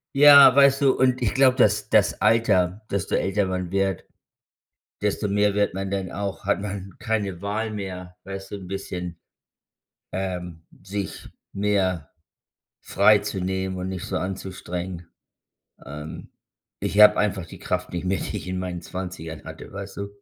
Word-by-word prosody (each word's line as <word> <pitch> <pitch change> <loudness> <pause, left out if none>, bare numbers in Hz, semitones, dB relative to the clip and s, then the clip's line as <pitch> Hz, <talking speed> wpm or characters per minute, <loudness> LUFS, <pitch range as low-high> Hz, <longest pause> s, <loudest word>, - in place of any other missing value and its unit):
Ja, 140 -2 +9
weißt 140 0 +5
du, 135 - +5
und 130 -1 +2
ich 105 - +1
glaube, 130 -1 +4
das 105 -4 +3
das - - +3
Alter, 105 -3 +2
desto 100 -1 -1
älter 100 0 0
man 90 -1 -3
wird, 95 -2 0 1.0
desto 105 0 -1
mehr 105 0 +2
wird 100 -2 +1
man 95 0 -4
dann 95 -2 -2
auch 100 -1 -5
hat - - +1
man 100 -1 -5
keine 105 -6 -2
Wahl 105 +3 -2
mehr, 90 -3 -7
weißt 95 0 -7
du, 100 - -5
'n 95 -2 -10
bisschen, 90 -3 -5 1.0
ähm, 90 -3 -4 0.2
sich 100 +1 -5 0.2
mehr 95 -6 0 0.7
frei 105 +2 +4
zu 100 -2 -4
nehmen 95 0 -2
und 90 0 -4
nicht 95 -2 -5
so - - -4
anzustrengen. 90 -2 -5 0.8
Ähm, 75 +2 -8 0.5
ich 100 - 0
habe 105 - +9
einfach 95 -4 0
die - - -12
Kraft - - -3
nicht 90 +1 -4
mehr, 95 +1 0
die 105 - -4
ich 90 -3 -6
in 90 0 -3
meinen 90 -2 -4
20ern 85 -4 -7
hatte, - - -10
weißt - - -8
du? 100 0 -4
95 Hz, 160 wpm, -24 LUFS, 90-105 Hz, 1.0 s, Ja